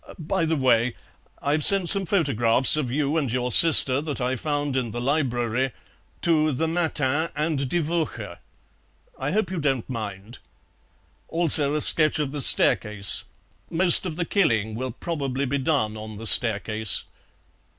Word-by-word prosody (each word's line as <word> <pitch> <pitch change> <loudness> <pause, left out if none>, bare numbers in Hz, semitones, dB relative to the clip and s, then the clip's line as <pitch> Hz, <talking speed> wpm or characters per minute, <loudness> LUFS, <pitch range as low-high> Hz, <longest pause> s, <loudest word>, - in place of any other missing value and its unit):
By 165 0 -2
the 160 0 -1
way, 125 -3 +1 0.5
I've 150 +2 0
sent 195 0 +5
some 195 -2 +2
photographs 130 - +2
of 150 -5 -3
you 145 +4 -1
and 140 -7 -2
your 125 0 -2
sister, 140 -3 +7
that 150 -2 -4
I 125 +1 -2
found 145 +1 -3
in 125 -3 -2
the 120 - -6
library, 125 -2 -2 0.5
to 155 -2 +2
the 160 +4 -2
MATIN 160 -2 -1
and 150 -3 -2
DIE 175 - -1
WOCHE; 165 +1 -4 0.8
I - - -3
hope 205 -4 -2
you 185 - -4
don't 135 -6 -2
mind. 110 -2 -7 0.9
Also 155 -3 +3
a 150 - -1
sketch 155 +1 +3
of 145 -3 -3
the 145 -1 -4
staircase; 105 -5 +1 0.4
most 180 +2 +3
of 160 - -6
the 175 +1 -3
killing 110 - 0
will 130 +4 -5
probably 140 -1 -4
be 140 +2 -2
done 130 -7 -1
on 110 -1 -9
the 115 - -9
staircase." 110 -1 +1
140 Hz, 155 wpm, -23 LUFS, 120-160 Hz, 0.9 s, sister